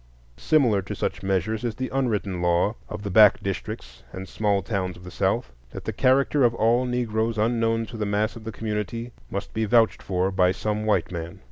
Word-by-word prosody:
Similar 120 - +3
to 100 +2 -6
such 105 - -3
measures 95 +4 -1
is 115 -3 -2
the 130 +2 -4
unwritten 105 -9 -1
law 90 +4 +2 0.2
of 105 -1 -6
the 100 - -4
back 105 0 +7
districts 95 -8 -5
and 95 0 -7
small 100 -2 0
towns 95 -3 -2
of 90 - -14
the 90 - -9
South, - - 0 0.2
that - - -8
the - - -3
character 135 +2 +3
of 120 -1 +3
all 120 +3 +2
Negroes 115 -2 -1
unknown 115 0 +1
to 115 - -9
the 105 -1 -2
mass 105 +3 0
of 115 - -10
the 110 - -5
community 110 +2 -4 0.2
must - - -5
be 110 0 0
vouched 115 +1 +3
for 95 0 -1
by 90 -1 +3
some 105 +2 -2
white 95 -5 +1
man. 85 -1 -6
105 Hz, 205 wpm, -25 LUFS, 95-115 Hz, 0.2 s, back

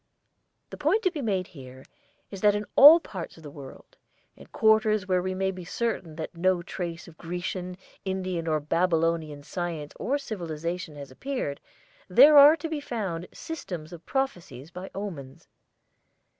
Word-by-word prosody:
The - - -7
point 445 +2 +1
to 370 - +2
be 305 - -5
made 195 -6 -1
here 130 -4 -13 0.5
is 195 -2 -8
that 205 -1 +4
in 210 0 -2
all 305 +4 +10
parts 185 - -8
of 165 - -15
the 145 - -9
world 140 -2 -13 0.4
in - - -15
quarters 215 -2 +2
where 185 -1 +2
we 185 +1 -3
may 190 0 0
be 185 -1 -9
certain 185 -4 -3
that 160 +2 -6
no 180 0 +1
trace 170 -1 -6
of 165 -2 -16
Grecian, 180 +1 -5 0.3
Indian, 185 -3 -3
or 155 -1 +1
Babylonian 165 -2 0
science 165 -3 -5
or 280 +3 0
civilization 170 - -5
has 140 -2 -9
appeared 195 - -4 0.5
there 275 +11 +7
are 290 +2 +9
to 330 +1 -5
be 315 -2 -3
found 195 -10 -4
systems 180 - -7
of 170 -1 -11
prophecies 175 - -3
by 180 +3 -8
omens. 165 -7 -7
180 Hz, 160 wpm, -27 LUFS, 165-215 Hz, 0.5 s, all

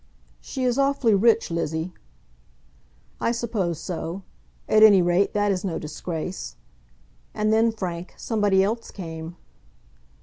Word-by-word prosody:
"She 265 - -5
is 250 +1 +1
awfully 275 -5 +3
rich, 225 0 +3
Lizzie." 165 +1 -2 1.3
"I 230 - +1
suppose 215 -8 -2
so. 180 +1 -5 0.4
At 215 - +4
any 210 -3 +8
rate, 175 +2 +2
that 205 0 +2
is 185 -2 -2
no 185 -4 -2
disgrace. 160 +3 -5 0.8
And 215 +1 +1
then, 225 +1 +4
Frank, 180 -5 -6
somebody 205 -4 +2
else 225 +4 -2
came." 165 -2 -7
195 Hz, 125 wpm, -24 LUFS, 175-225 Hz, 1.3 s, any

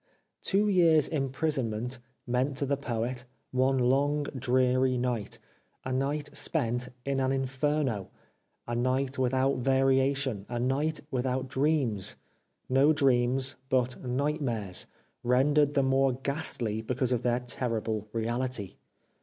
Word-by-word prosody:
Two 205 +2 +2
years' 170 -6 +5
imprisonment 130 -5 -2 0.3
meant 130 +2 0
to 140 - +1
the 140 +1 +1
Poet 120 -1 -3 0.3
one 130 +1 +2
long, 140 +4 +2
dreary 130 0 +2
night 120 -4 -2 0.2
— - - -40
a 130 - -2
night 145 +3 -2
spent 125 -4 -1 0.2
in 135 -1 0
an 130 0 +1
In 135 0 0
ferno, 135 -6 -1 0.6
a 120 - -3
night 130 +3 0
without 130 +1 +2
variation, 135 -3 +1
a 120 - -3
night 140 +5 0
without 130 +1 -1
dreams: 130 -7 0 0.5
no 135 +4 +4
dreams, 130 -1 +2
but 130 -2 0
nightmares, 125 - -1 0.3
rendered 145 +4 +3
the 140 - +4
more 135 0 +3
ghastly 130 -5 -2
because 125 +2 -1
of 120 -2 +1
their 120 0 +1
terrible 115 -3 -3
reality. 115 -2 -2
130 Hz, 125 wpm, -29 LUFS, 125-140 Hz, 0.6 s, years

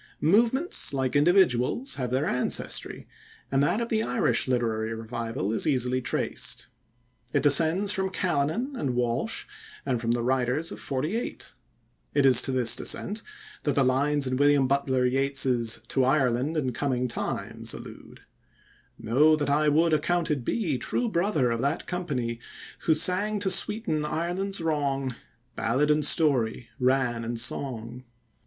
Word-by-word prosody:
Movements, 230 - +2
like 130 0 -1
individuals, 175 - +2
have 125 -3 -3
their 130 +4 0
ancestry, 125 - -2 0.4
and 135 0 +2
that 145 +9 +1
of 235 0 -3
the 220 -1 0
Irish 125 - 0
Literary 115 -3 -1
Revival 115 -2 -4
is 115 - 0
easily 130 -2 +1
traced. 120 - -3 0.7
It 140 - +2
descends 165 +7 +6
from 190 -2 -1
Callanan 185 - -1
and 135 - -2
Walsh, 125 - -1 0.4
and 125 -4 -1
from 115 - -3
the 120 0 0
writers 130 +5 0
of - - -8
'48. 155 - -4 0.6
It 140 -2 +3
is 130 -3 +8
to - - -2
this 120 -2 +3
descent 210 +3 -1 0.4
that 145 -3 -1
the 140 - +3
lines 140 +3 +1
in 130 0 -1
William 145 -1 +3
Butler 130 -1 0
Yeats's 130 -3 +1
"To 135 - +1
Ireland 130 +2 +1
in 130 -5 -1
Coming 125 -1 -1
Times" 115 - -4
allude: - - -11 0.8
Know 150 +8 +3
that 145 -2 -2
I 150 +1 +2
would 160 +2 +2
accounted 155 -3 0
be 160 - -2
True 240 - -1
brother 170 - 0
of 115 0 -2
that 140 +3 -2
company, 135 -10 -3 0.5
Who 160 - +4
sang 185 +6 +3
to 190 -2 0
sweeten 210 -6 0
Ireland's 175 +5 -2
wrong, 140 -4 -1 0.4
Ballad 140 +6 +1
and 150 0 +1
story, 130 -7 +1
rann 125 -2 +1
and 115 0 -4
song. 120 0 -3
140 Hz, 145 wpm, -26 LUFS, 125-165 Hz, 0.8 s, is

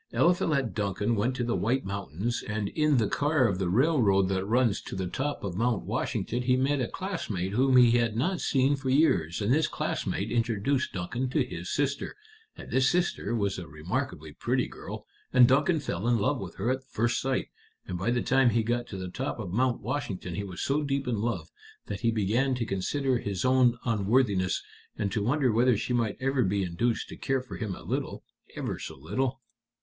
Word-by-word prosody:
Eliphalet 155 -7 +2
Duncan 105 +1 -1
went 120 +5 0
to 125 - -1
the 120 0 0
White 125 +5 0
Mountains, 100 - -3
and 105 -1 -2
in 150 -2 +2
the 110 -3 +2
car 145 +1 +2
of 95 -3 -1
the 95 -2 0
railroad 105 - +3
that 95 -1 0
runs 115 -2 +2
to - - -7
the 95 -1 -2
top 140 +11 -3
of 100 -3 -3
Mount 115 +1 +1
Washington 120 +2 -2
he 125 0 +3
met 135 +1 +1
a 120 - 0
classmate 115 - -3
whom 130 +4 +4
he 120 -2 +7
had 115 -2 0
not 175 +8 0
seen 135 0 +2
for 135 -1 -4
years, 105 - +2
and 110 +5 +3
this 155 +1 +3
classmate - - -2
introduced 115 +3 0
Duncan 115 +8 -2
to 135 0 +1
his 90 -7 -6
sister, 140 0 -1 0.4
and - - -10
this 130 +2 +4
sister 175 - 0
was 100 -4 -1
a 85 - -8
remarkably 80 - -4
pretty - - 0
girl, - - -8 0.3
and 125 -2 +7
Duncan 150 +6 +3
fell 115 - -3
in 120 -1 +4
love 130 +7 +1
with 95 -3 -7
her 115 +6 0
at 130 0 -2
first 120 -2 0
sight, 130 0 -1 0.4
and 90 - -5
by 95 +5 0
the 120 0 +1
time 135 -1 +4
he 115 0 +2
got 120 +2 -1
to 100 - -7
the 95 -1 -4
top 130 +10 -4
of 100 -6 -5
Mount 125 +2 +1
Washington 110 -8 -3
he 100 - -3
was 95 -3 -6
so 140 +2 +1
deep 140 -2 -1
in 115 -4 0
love 95 -9 -2 0.3
that 100 - -5
he 115 - +2
began 115 +5 +1
to 120 -2 -2
consider 125 +7 0
his 100 -2 -3
own 130 -2 +4
unworthiness, 105 -3 +1 0.3
and 100 -2 -1
to 105 - -1
wonder 130 +3 +2
whether 120 +1 +3
she 125 +3 -2
might 115 -4 0
ever 135 0 +1
be 100 0 +1
induced 115 +7 -1
to - - -9
care 135 -2 -1
for 130 - -8
him 105 -5 -3
a - - -12
little - - -3 0.3
ever - - -3
so - - -7
little." 120 - -2
120 Hz, 205 wpm, -28 LUFS, 100-130 Hz, 0.4 s, he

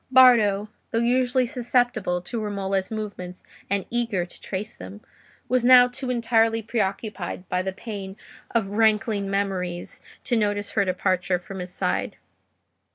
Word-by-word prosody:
Bardo, 230 -6 +6 0.2
though - - -1
usually 250 +2 +2
susceptible 245 -7 0
to 230 +3 -4
Romola's 195 -2 -2
movements 200 -5 -6 0.3
and 200 -1 0
eager 230 -7 0
to 175 - -16
trace 195 +2 -5
them, 95 +3 -10 0.5
was 255 -1 +2
now 250 0 +8
too 250 +1 -5
entirely 230 -2 +2
preoccupied 205 -4 -3
by 180 - +1
the 190 +1 -2
pain 200 -1 -7 0.3
of 215 -4 0
rankling 215 -1 +2
memories 185 -3 -2 0.2
to 245 - 0
notice 205 -2 0
her 200 -2 +2
departure 185 -1 0
from 190 +2 -9
his 180 0 -5
side. - - -1
205 Hz, 140 wpm, -24 LUFS, 190-235 Hz, 0.5 s, now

